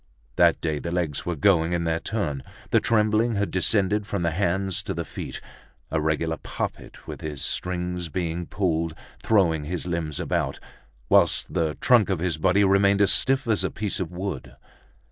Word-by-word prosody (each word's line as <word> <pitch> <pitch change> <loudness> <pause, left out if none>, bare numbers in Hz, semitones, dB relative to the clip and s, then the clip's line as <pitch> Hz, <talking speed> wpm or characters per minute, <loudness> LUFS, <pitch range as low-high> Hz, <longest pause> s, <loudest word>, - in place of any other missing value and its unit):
That - - +4
day 75 -2 -1
the 85 - -5
legs 85 -5 -2
were 90 - -1
going 85 +1 +3
in 85 -1 0
their 80 0 0
turn, 75 -12 -3 0.3
the - - +5
trembling 110 +1 +2
had 100 0 -1
descended 100 +2 +1
from 100 -5 -2
the 85 - +1
hands 95 +1 -1
to - - -5
the - - -3
feet; - - -7 0.5
a 80 - 0
regular 80 +1 0
puppet - - -6
with - - -8
his 75 -3 -5
strings 90 -1 -2
being 85 +1 -3
pulled, 80 -4 -1 0.3
throwing 85 -9 +2
his 85 +2 -4
limbs 85 -4 -2
about, - - -1 0.5
whilst - - +3
the 80 -4 0
trunk 120 -6 +4
of 95 - +1
his 80 -2 -1
body 90 +5 +3
remained 100 +1 +4
as 100 - +5
stiff 135 -1 +3
as 110 -3 +1
a - - 0
piece 105 -2 -3
of 90 -4 -3
wood. 90 -5 -5
90 Hz, 180 wpm, -25 LUFS, 80-100 Hz, 0.5 s, the